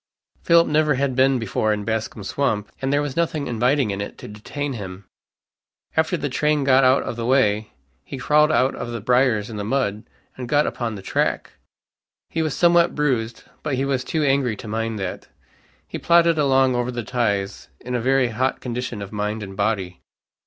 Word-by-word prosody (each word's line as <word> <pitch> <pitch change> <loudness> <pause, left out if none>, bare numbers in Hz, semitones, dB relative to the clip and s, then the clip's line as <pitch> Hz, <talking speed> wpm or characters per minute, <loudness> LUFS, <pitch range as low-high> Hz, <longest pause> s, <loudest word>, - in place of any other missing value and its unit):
Philip 170 0 +5
never 150 -1 +2
had 135 -1 -1
been 135 0 +4
before 110 -1 -1
in 105 -1 -1
Bascom's 110 -2 -3
swamp, 110 -7 -1
and 135 0 -1
there 145 +1 +2
was 145 -2 -4
nothing 160 -3 -1
inviting 125 0 +1
in 100 0 -3
it 100 - -6
to - - -10
detain 135 +7 -5
him. 100 -3 -8 0.9
After 160 +3 +1
the 150 - -2
train 150 +2 +1
got 135 0 +4
out 130 +1 +4
of 115 - -5
the 115 - -3
way 110 -5 +2 0.3
he 135 - -7
crawled 150 +4 +3
out 130 -3 +2
of 120 - -6
the 120 -1 -4
briars 125 -2 +2
and 110 -3 -7
the - - -3
mud, 110 -2 -1 0.3
and 125 -2 -7
got 150 +2 +3
upon 115 -3 -3
the 95 - -9
track. - - -1 0.8
He 165 - -1
was 155 -3 -1
somewhat 170 0 +4
bruised, 120 -6 -1 0.2
but 140 - -2
he 135 +2 -1
was 135 -2 -1
too 155 +2 -1
angry 135 -5 +1
to 110 - -10
mind 115 +1 -2
that. 95 -3 -5 0.6
He - - -6
plodded 170 -1 +4
along 135 -2 +3
over 120 0 -1
the 120 -1 -4
ties 100 -5 -2
in 125 - -6
a 125 - 0
very 130 0 +2
hot 130 +4 -1
condition 120 -3 -4
of 100 - -9
mind 105 +1 -3
and 95 -1 -8
body. 100 -3 -2
125 Hz, 195 wpm, -22 LUFS, 110-140 Hz, 0.9 s, Philip